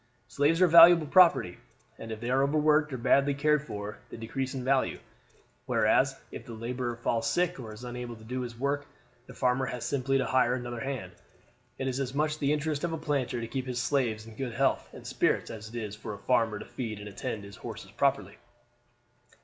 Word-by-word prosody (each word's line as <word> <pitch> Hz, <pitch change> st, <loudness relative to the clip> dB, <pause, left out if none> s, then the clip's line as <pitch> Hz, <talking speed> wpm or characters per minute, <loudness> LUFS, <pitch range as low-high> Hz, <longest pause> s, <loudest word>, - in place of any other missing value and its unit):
Slaves 150 Hz, +4 st, +2 dB
are -, -, +7 dB
valuable 170 Hz, 0 st, +8 dB
property, 165 Hz, -, +4 dB, 0.4 s
and 115 Hz, -, -7 dB
if 110 Hz, -, -5 dB
they 120 Hz, +2 st, -3 dB
are 135 Hz, +1 st, +3 dB
overworked 150 Hz, +1 st, +3 dB
or 130 Hz, -, -3 dB
badly 135 Hz, +3 st, +3 dB
cared 150 Hz, +1 st, +2 dB
for 105 Hz, -7 st, -7 dB
they -, -, -9 dB
decrease 130 Hz, +4 st, -4 dB
in 130 Hz, -, -4 dB
value. 135 Hz, +1 st, +1 dB, 0.7 s
Whereas -, -, +2 dB
if -, -, -8 dB
the 120 Hz, -, -9 dB
laborer 120 Hz, +2 st, -3 dB
falls 115 Hz, -1 st, -1 dB
sick 180 Hz, 0 st, 0 dB
or 115 Hz, -4 st, -7 dB
is 105 Hz, +3 st, -11 dB
unable 120 Hz, -1 st, -6 dB
to 110 Hz, -, -15 dB
do 125 Hz, +3 st, -4 dB
his 120 Hz, -2 st, -6 dB
work 140 Hz, +2 st, -1 dB, 0.4 s
the -, -, -12 dB
farmer 130 Hz, +1 st, +1 dB
has 125 Hz, -2 st, -4 dB
simply 135 Hz, -1 st, 0 dB
to 135 Hz, -, 0 dB
hire 125 Hz, -1 st, +2 dB
another 120 Hz, -1 st, -5 dB
hand. 125 Hz, -7 st, -4 dB, 0.7 s
It 130 Hz, -, -3 dB
is 130 Hz, 0 st, -2 dB
as 135 Hz, -1 st, -3 dB
much 155 Hz, +1 st, 0 dB
the 140 Hz, 0 st, +1 dB
interest 150 Hz, 0 st, -1 dB
of 170 Hz, -1 st, -1 dB
a -, -, -2 dB
planter 140 Hz, -6 st, -1 dB
to 115 Hz, -, -4 dB
keep 130 Hz, +2 st, -4 dB
his 125 Hz, -1 st, -2 dB
slaves 120 Hz, -6 st, 0 dB
in 115 Hz, -1 st, -12 dB
good 125 Hz, -1 st, -4 dB
health -, -, +1 dB
and -, -, -12 dB
spirits -, -, 0 dB
as 110 Hz, -1 st, -8 dB
it 115 Hz, -, -12 dB
is 105 Hz, -3 st, -4 dB
for 110 Hz, -1 st, -7 dB
a 100 Hz, -, -16 dB
farmer 115 Hz, -4 st, +2 dB
to -, -, -8 dB
feed 115 Hz, -5 st, -5 dB
and 105 Hz, 0 st, -8 dB
attend 105 Hz, +1 st, -5 dB
to -, -, -9 dB
his 100 Hz, -, -13 dB
horses -, -, -8 dB
properly. -, -, 0 dB
125 Hz, 215 wpm, -29 LUFS, 115-140 Hz, 0.7 s, valuable